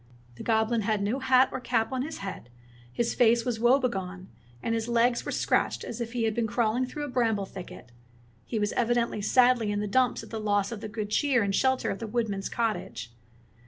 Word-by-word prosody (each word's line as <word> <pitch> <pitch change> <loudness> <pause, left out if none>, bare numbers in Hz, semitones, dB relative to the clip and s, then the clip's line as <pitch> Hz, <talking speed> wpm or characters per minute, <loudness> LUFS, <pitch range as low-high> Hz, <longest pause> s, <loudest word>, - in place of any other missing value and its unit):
The 120 - -11
goblin 220 0 +1
had 210 -1 0
no 225 +7 -1
hat 260 0 +4
or - - -3
cap 230 -2 0
on 260 -1 -1
his 310 +4 -5
head, 180 -10 -7 0.4
his 235 - -1
face 235 -1 +3
was 240 -3 -1
woe 240 +3 +5
begone, 190 -7 -3 0.3
and 230 - 0
his 225 0 -1
legs 235 +1 +2
were - - -4
scratched - - 0
as 240 +1 -6
if 230 0 -4
he 240 -2 -1
had 220 -1 +1
been 230 0 0
crawling 235 +3 0
through 295 +3 -6
a - - -3
bramble 225 -6 0
thicket. 180 -10 -10 0.6
He 230 - -2
was 210 -1 0
evidently 235 -2 0
sadly 245 -1 +3
in 205 - -1
the 210 - -1
dumps 250 +5 +1
at - - -13
the 225 - -3
loss 205 -1 0
of 220 -3 -6
the 215 - -5
good 210 -1 -5
cheer 260 -2 +2
and 200 -1 -1
shelter 260 +5 +1
of 195 - -5
the 225 - -5
woodman's 210 -4 -2
cottage. 220 - -3
230 Hz, 220 wpm, -28 LUFS, 205-245 Hz, 0.6 s, woe